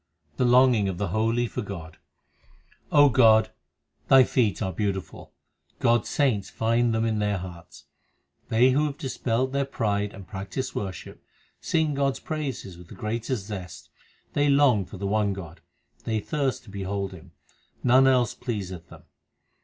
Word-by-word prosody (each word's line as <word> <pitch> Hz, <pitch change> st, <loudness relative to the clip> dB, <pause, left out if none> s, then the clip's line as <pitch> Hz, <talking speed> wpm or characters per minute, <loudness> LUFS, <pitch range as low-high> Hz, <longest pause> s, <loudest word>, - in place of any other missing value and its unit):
The 125 Hz, -, +2 dB
longing 120 Hz, -4 st, +4 dB
of 90 Hz, -, -4 dB
the 100 Hz, -1 st, -2 dB
holy 115 Hz, +5 st, +1 dB
for -, -, -4 dB
God: 85 Hz, -6 st, -8 dB, 0.9 s
God, 120 Hz, -6 st, +5 dB, 0.6 s
Thy 135 Hz, -1 st, +7 dB
feet 115 Hz, -8 st, +1 dB
are 95 Hz, -, -2 dB
beautiful; 95 Hz, 0 st, -4 dB, 0.5 s
God 120 Hz, 0 st, +3 dB
s -, -, -9 dB
saints 120 Hz, -9 st, +1 dB
find 115 Hz, +1 st, +1 dB
them 110 Hz, 0 st, 0 dB
in 110 Hz, -2 st, 0 dB
their 105 Hz, -1 st, 0 dB
hearts. 90 Hz, -2 st, -10 dB, 0.6 s
They 125 Hz, +4 st, +4 dB
who 145 Hz, +2 st, +1 dB
dispel 130 Hz, -4 st, -1 dB
their 140 Hz, +1 st, -1 dB
pride 105 Hz, -6 st, -1 dB
and 100 Hz, -, -10 dB
practise 100 Hz, +8 st, -5 dB
worship, 95 Hz, -3 st, -6 dB, 0.4 s
sing 160 Hz, -2 st, 0 dB
God 140 Hz, -1 st, +1 dB
s -, -, -9 dB
praises 135 Hz, -, -5 dB
with 90 Hz, -, -13 dB
the -, -, -12 dB
greatest 115 Hz, 0 st, -3 dB
zest: 95 Hz, -5 st, -8 dB, 0.4 s
They 145 Hz, 0 st, +2 dB
long 140 Hz, -8 st, +4 dB
for 95 Hz, +2 st, -10 dB
the 100 Hz, -, -5 dB
one 105 Hz, 0 st, +1 dB
God; 85 Hz, -5 st, -9 dB, 0.4 s
they 110 Hz, -1 st, -1 dB
thirst 140 Hz, 0 st, -2 dB
to 105 Hz, -, -14 dB
behold 100 Hz, 0 st, -3 dB
Him; 90 Hz, -2 st, -13 dB, 0.5 s
none 130 Hz, +2 st, +5 dB
else 125 Hz, -4 st, +3 dB
pleaseth 95 Hz, -8 st, -6 dB
them. -, -, -14 dB
110 Hz, 155 wpm, -26 LUFS, 100-130 Hz, 0.9 s, Thy